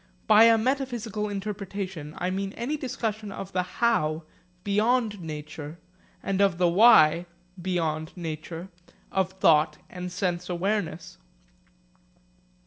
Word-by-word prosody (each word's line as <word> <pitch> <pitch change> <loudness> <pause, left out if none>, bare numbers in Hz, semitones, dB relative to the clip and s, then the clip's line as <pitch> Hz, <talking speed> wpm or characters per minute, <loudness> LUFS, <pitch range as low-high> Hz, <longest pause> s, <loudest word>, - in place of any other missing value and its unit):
By 220 +2 +7
a 230 0 +6
metaphysical 235 -4 -2
interpretation 195 -5 -5
I 180 +1 -1
mean 195 +1 -3
any 245 +6 -3
discussion 220 -7 -4
of 195 0 -7
the 180 - +2
how 180 -5 0 0.4
(beyond 215 0 +1
nature) 155 0 -7 0.5
and 195 0 0
of 195 -4 +3
the 180 0 +3
why 175 -4 +6 0.3
(beyond 160 -3 -1
nature) 165 +1 -6 0.4
of 190 -1 0
thought 155 -4 +3
and 180 0 -6
sense 180 -1 -2
awareness. 180 -2 -2
190 Hz, 115 wpm, -26 LUFS, 170-210 Hz, 0.5 s, By